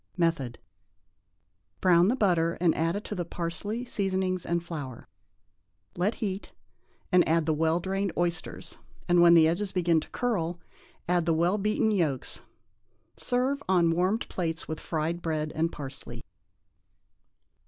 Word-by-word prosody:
Method. 165 -8 0 1.2
Brown 175 -1 +5
the 240 - +2
butter 170 -8 +2
and 170 -2 +3
add 165 +1 0
to - - -4
it - - -4
the 175 - -1
parsley, 180 +8 -4
seasonings 190 -4 -1
and 170 0 0
flour; 145 -8 -7 0.9
let 190 +6 0
heat, 195 -2 -4 0.6
then 180 -1 +6
add 165 0 +2
the 160 - +2
well 160 +2 +2
drained 195 +1 -1
oysters, 170 -1 -3 0.3
and, 175 -1 +5
when 170 0 +8
the 160 -1 +7
edges 190 +4 -1
begin 175 -3 +2
to - - -9
curl, 180 -9 -1 0.5
add 175 -1 +1
the 165 - +3
well 175 +6 +2
beaten 215 +2 +1
yolks. 160 -10 -1 0.7
Serve 260 +3 0
on 175 -3 +4
warmed 185 +7 +1
plates, 165 -2 -3
with 160 - -4
fried 165 +2 -2
bread 155 -2 -2
and 165 +1 0
parsley. 135 -2 -8
170 Hz, 145 wpm, -28 LUFS, 165-190 Hz, 1.2 s, when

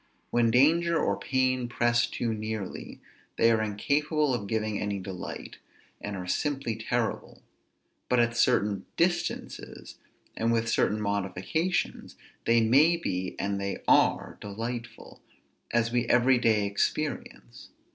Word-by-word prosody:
When 120 -1 +3
danger 165 +8 +4
or 100 - +1
pain 130 +2 0
press 120 0 +2
too 115 -2 -2
nearly, 110 -2 -5 0.4
they 115 0 +5
are 110 -1 +2
incapable 145 +7 0
of 105 -5 -3
giving 110 -1 -1
any 105 -1 -2
delight, 95 -1 -7 0.4
and 105 -1 -5
are 90 - -5
simply 135 - -1
terrible; 110 0 -3 0.7
but 125 - +3
at 120 0 +2
certain 100 -3 +1
distances, 175 0 -2 0.4
and 115 +1 0
with 115 0 +1
certain 105 -1 +1
modifications, 100 - -2 0.3
they 115 0 +4
may 145 +10 +5
be, 95 - -3
and 100 0 -2
they 100 0 -4
are, - - +3
delightful, 115 +3 -7 0.5
as 115 0 +1
we 120 0 0
every 125 +1 +4
day 110 -3 +2
experience. 100 - -3
115 Hz, 125 wpm, -28 LUFS, 105-130 Hz, 0.7 s, they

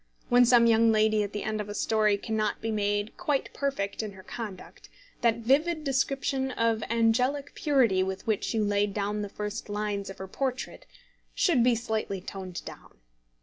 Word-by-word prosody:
When 245 0 +6
some 240 -1 +6
young 230 0 +5
lady 215 0 +3
at 205 -1 -2
the 205 - -4
end 215 0 -2
of 205 - -7
a 205 - -5
story 215 -1 +2
cannot 215 0 -2
be 225 - -3
made 205 0 -1
quite 295 -6 -1
perfect 270 -9 -2
in 215 -2 -6
her 190 -1 -13
conduct, 210 -5 -8 0.3
that 230 -1 +1
vivid 310 +5 +2
description 270 -1 0
of 230 -3 0
angelic 250 +5 +1
purity 250 -11 +2
with 190 0 -3
which 215 -3 0
you 220 - +2
laid 205 -1 +1
the 205 0 -2
first 210 +1 -5
lines 205 -1 -2
of 195 - -8
her 190 - -7
portrait 255 +5 -4 0.5
should 335 -12 +3
be 245 -1 +4
slightly 220 -4 -2
toned 185 -1 -7
down. - - -11
220 Hz, 175 wpm, -28 LUFS, 205-250 Hz, 0.5 s, When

